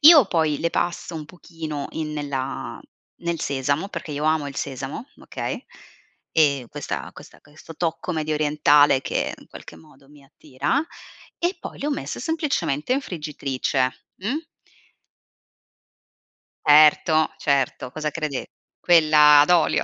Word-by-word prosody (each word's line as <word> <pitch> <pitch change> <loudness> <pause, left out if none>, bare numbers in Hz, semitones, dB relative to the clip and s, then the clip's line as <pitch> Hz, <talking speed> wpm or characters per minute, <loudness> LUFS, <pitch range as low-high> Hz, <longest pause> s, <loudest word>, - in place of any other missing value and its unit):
Io 300 - +9
poi 160 -5 +1
le 170 - 0
passo 170 0 -2
un 155 -1 -5
pochino 160 -4 -7
in 155 -1 -4
nella 140 -3 -4 0.4
nel 170 -1 -2
sesamo, 140 +7 -1
perché 160 - -7
io 145 +1 -3
amo 155 -2 +1
il 140 - -10
sesamo, 135 - -5
okay, - - -5 0.7
e 140 -6 +3
questa - - -5
questa - - -14
questo 150 +2 -14
tocco 165 +1 -2
mediorientale 150 -2 +3
che - - -2
in - - -18
qualche 80 - -11
modo 135 +12 -20
mi 145 -1 -18
attira 150 - -2 0.5
e 350 +2 -1
poi - - -8
le 285 - -3
ho 300 - 0
messe 280 - -4
semplicemente 285 - -1
in 275 - +2
friggitrice, 135 - -2
mh? 275 - -3 2.2
Certo, 155 +1 +5
certo. 135 -3 0
Cosa 155 -1 -3
crede 150 -4 -4 0.3
quella 155 -3 +6
ad 150 - +2
olio? 175 -2 +3
150 Hz, 135 wpm, -23 LUFS, 140-170 Hz, 2.2 s, Io